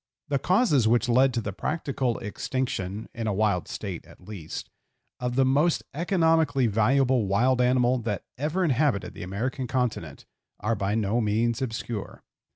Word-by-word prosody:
The 140 -1 +1
causes 180 - +3
which 120 +2 +3
led 130 +3 +4
to 120 - 0
the 100 -2 -4
practical 135 - -2
extinction 105 -2 -3
(in 115 -2 -4
a 105 - 0
wild 100 -4 +1
state, - - -5
at - - -16
least) 95 -7 -7 0.5
of 125 0 -2
the 135 0 +4
most 145 +6 +2
economically 160 -5 +2
valuable 120 +2 +2
wild 125 +6 +2
animal 125 0 +3
that 105 -5 -3
ever 155 +8 -1
inhabited 140 - +1
the - - -10
American 115 +8 -3
continent, 115 - -2 0.3
are 115 - 0
by 100 -1 -1
no 110 +2 +1
means 115 +3 0
obscure. 115 -4 -5
120 Hz, 155 wpm, -26 LUFS, 105-135 Hz, 0.5 s, led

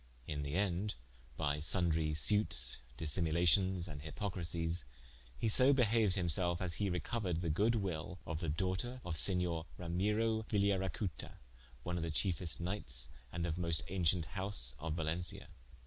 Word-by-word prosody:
In 75 -1 -3
the 70 +2 -3
ende 100 +1 0 0.4
by 75 -2 0
sundrie 80 -1 +1
sutes, 105 +7 +1 0.2
dissimulations, 85 +3 +2
and 75 -3 -7
hipocrisies, 85 -1 -2 0.5
he - - 0
so 130 +6 +9
behaued 110 -6 +3
him 90 -3 0
self, 85 +1 0
as 90 -3 -2
he 100 +4 -1
recouered 90 0 -2
the 85 -3 0
good 105 +9 +2
wil 90 -4 -3
of 80 -1 -3
the 85 - -2
doughter 95 +10 -2
of 85 -2 -3
Senior 90 -2 +1 0.2
Ramyrio 105 +6 0
Vigliaracuta, 100 -3 -1 0.5
one 90 0 -2
of 85 - -2
the 85 - -2
chiefest 85 +1 -1
knightes, 65 -10 -4 0.2
and 85 0 -2
of 85 +1 -2
moste 85 -2 0
auncient 90 -2 +1
house 95 -10 +3
of 80 +1 -3
Valentia. 85 +2 -2
90 Hz, 150 wpm, -36 LUFS, 80-100 Hz, 0.5 s, so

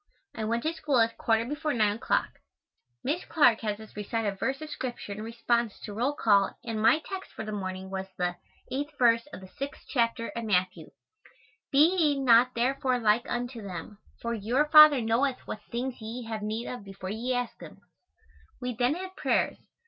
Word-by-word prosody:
I 220 - -4
went 235 +2 -1
to 315 - 0
school 295 -5 0
at 230 0 +2
quarter 225 0 +1
before 295 +3 -2
9 210 -2 +2
o'clock. 240 - -1 0.6
Miss 310 +6 -1
Clark 245 -8 +4
has 210 -2 -2
us 220 -1 -13
recite 215 +2 -2
a 200 -1 -1
verse 265 +7 -2
of 310 -1 -8
scripture 245 -6 -5
in 205 +1 -5
response 230 0 -1
to 210 - -7
roll 250 +7 0
call 200 -7 +3
and 225 -2 -3
my 305 +8 +4
text 385 -1 -6
for 220 - -6
the 215 - -5
morning 190 -2 -5
was 190 0 -4
the 180 -1 -1 0.4
8th 290 +3 -3
verse 235 0 +4
of - - -9
the 190 - -11
6th 275 +9 -7
chapter 230 -2 0
of 230 -1 -5
Matthew, 185 -3 0 0.8
"Be 285 +2 +7
ye 300 -6 +2
not 250 -1 +5
therefore 255 +1 +1
like 225 0 +2
unto 240 -1 -3
them; 200 +1 -7 0.2
for 235 0 -3
your 235 +7 +1
Father 305 -4 +9
knoweth 245 +4 +1
what 210 - -6
things 245 +1 -3
ye 230 +3 -6
have 225 -1 -5
need 215 +3 -3
of 245 -4 -6
before 195 -1 -7
ye 240 +4 -2
ask 245 -1 -3
him." - - -11 0.8
We 250 -1 -3
then 245 +5 +1
had 375 +1 -7
prayers. - - +1
235 Hz, 195 wpm, -28 LUFS, 215-265 Hz, 0.8 s, Father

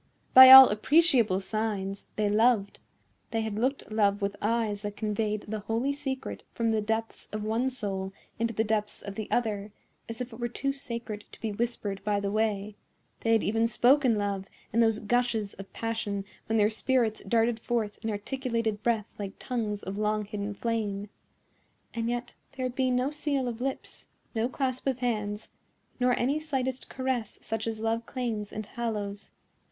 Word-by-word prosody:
By 260 0 +12
all 265 0 +13
appreciable 235 - +3
signs, 200 -1 -3
they 210 -1 +1
loved; 215 -1 +2 0.5
they 225 - -1
had 220 -1 -3
looked 260 0 -1
love 205 -2 +2
with 200 -1 -2
eyes 215 -1 0
that 205 0 -5
conveyed 215 -1 -1
the 215 +1 -4
holy 225 +7 -1
secret 270 -2 -4
from 230 -1 +1
the 220 -1 +1
depths 225 +1 -3
of 215 0 -4
one 225 +4 +1
soul 195 -6 -4 0.3
into 230 0 +1
the 220 0 0
depths 210 -1 -2
of 200 - -6
the 215 +1 -5
other, 210 -3 -1 0.4
as 230 - -6
if 250 -1 -5
it 225 - -10
were 240 - -1
too 275 +3 -2
sacred 235 -6 -6
to - - -13
be 220 - -3
whispered 205 -3 -3
by 205 -1 +1
the 200 0 -2
way; 210 -1 0 0.4
they 225 - +2
had 225 - +3
even 225 +2 +2
spoken 250 +1 +4
love 200 -1 -2 0.3
in 230 - +2
those 225 -2 +4
gushes 225 -2 0
of 195 0 -11
passion 220 -3 -3 0.2
when 225 - +1
their 210 0 +4
spirits 225 -1 +1
darted 230 0 +2
forth 225 -3 -2
in 225 - -1
articulated 230 0 -2
breath 225 -2 0
like 195 -1 -4
tongues 215 -5 -3
of 195 +2 -5
long 215 0 0
hidden 205 0 -4
flame; 210 -3 -2 0.8
and 230 0 -2
yet 240 0 -3 0.2
there 260 -1 -3
had 250 - -2
been 255 -1 +1
no 255 +3 +1
seal 290 -3 -1
of 240 0 -4
lips, 270 +1 -4 0.3
no 230 +1 0
clasp 260 -1 -2
of 265 -3 +1
hands, 215 -4 -2 0.5
nor 250 0 +3
any 275 +5 +1
slightest 265 -4 -3
caress 260 -5 -2
such 225 0 -3
as 220 -1 -3
love 225 +1 -1
claims 230 -6 -3
and 215 0 -5
hallows. 210 -3 -4
225 Hz, 180 wpm, -28 LUFS, 210-245 Hz, 0.8 s, all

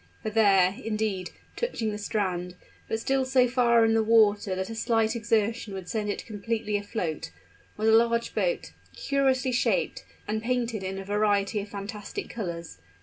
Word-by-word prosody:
For 215 - -2
there, 195 -4 +4
indeed, 215 -4 -2 0.3
touching 245 - -2
the 210 - -5
strand, 185 -4 -2 0.3
but 220 - -1
still 270 +3 +1
so 260 -1 +3
far 235 -2 +4
in 225 - +3
the 225 - +4
water 215 -3 +4
that 190 +3 -3
a - - -4
slight 225 0 +1
exertion 225 -2 0
would 190 -2 -7
send 210 0 -2
it - - -3
completely 215 0 -3
afloat, 205 -6 -3 0.5
was 215 +1 0
a - - +6
large 235 +1 +3
boat, - - -1 0.2
curiously 265 -2 +1
shaped, 255 - 0 0.2
and 215 +1 -1
painted 235 -2 -1
in 190 0 -4
a 195 - -6
variety 205 0 +1
of 205 - -9
fantastic 205 +1 -6
colors. 170 - -6
220 Hz, 165 wpm, -27 LUFS, 200-235 Hz, 0.5 s, a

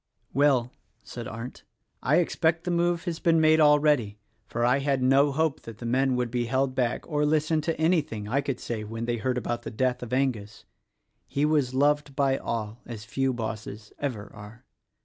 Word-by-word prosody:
"Well," 130 -3 +3 0.3
said 120 -2 -7
Arndt, 115 +3 -7 0.4
"I 140 - +2
expect 165 -1 +1
the 180 - -2
move 175 0 +1
has 170 -3 -3
been 165 -1 +3
made, 155 0 +5
already; 150 -8 +4 0.3
for 120 0 -1
I 125 +3 +3
had 135 -2 0
no 135 +2 +4
hope 155 +1 0
that 115 -2 -10
the 120 - -8
men 130 +2 +2
would 125 -2 -1
be 120 -1 0
held 130 +2 0
back 125 -2 -1
or 150 -2 0
listen 155 +1 +2
to 160 +1 -2
anything 155 - 0
I 135 +6 +1
could 135 -3 -3
say 110 -2 -4
when 115 +2 -5
they 120 0 -1
heard 125 +3 -1
about 120 -1 -2
the - - -6
death 125 +2 -1
of 120 - -7
Angus: 125 -6 -2 0.6
he 140 +2 0
was 145 -5 +1
loved 145 0 +2
by 135 -2 +2
all 110 0 -4
as 110 -3 -7
few 135 +4 0
bosses 110 -3 -6
ever 120 -8 -4
are. 105 +3 -12
130 Hz, 190 wpm, -27 LUFS, 115-150 Hz, 0.6 s, made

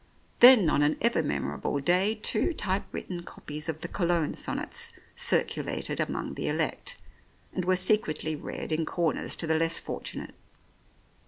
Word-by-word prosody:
Then 240 -7 +9
on 145 - +2
an 145 +1 +2
ever 235 -7 +2
memorable 145 -1 -2
day 180 +9 +3
two 220 +9 +1
type 195 -5 -1
written 175 -2 -5
copies 150 -2 -7
of 155 -1 -4
the 175 - -4
Cologne 170 -4 0
sonnets - - -2 0.2
circulated - - -1
among - - -2
the - - -3
elect, - - -1 0.6
and 185 - -2
were 185 0 +3
secretly 180 -5 +1
read 150 - -6
in 155 +1 +1
corners 165 0 -1
to - - -2
the 160 - +1
less 165 +1 +2
fortunate. - - -5
170 Hz, 150 wpm, -28 LUFS, 155-190 Hz, 0.6 s, Then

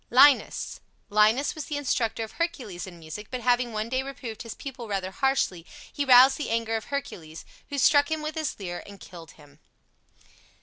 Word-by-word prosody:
LINUS 265 +3 +4 0.3
Linus 215 +7 +3
was 310 -3 -6
the 295 - -3
instructor 235 -5 -1
of 220 - -8
Hercules 250 - -4
in 175 -2 -11
music, 165 +6 -8
but 255 -1 -4
having 245 -1 +2
one 215 0 -3
day 260 +2 0
reproved 265 -5 -7
his 230 -2 -7
pupil 255 -4 -8
rather 190 -2 -3
harshly, 265 -8 0 0.3
he 285 - -1
roused 260 +1 +7
the 295 - -3
anger 225 0 0
of 220 - -3
Hercules, 165 - -6 0.2
who 285 - -4
struck 285 +2 +5
him 315 -1 -2
with 305 +1 -3
his 310 -7 -3
lyre 175 -3 -5
and 200 -1 -12
killed 165 -4 -12
him. 145 -1 -19
235 Hz, 185 wpm, -26 LUFS, 200-275 Hz, 0.3 s, roused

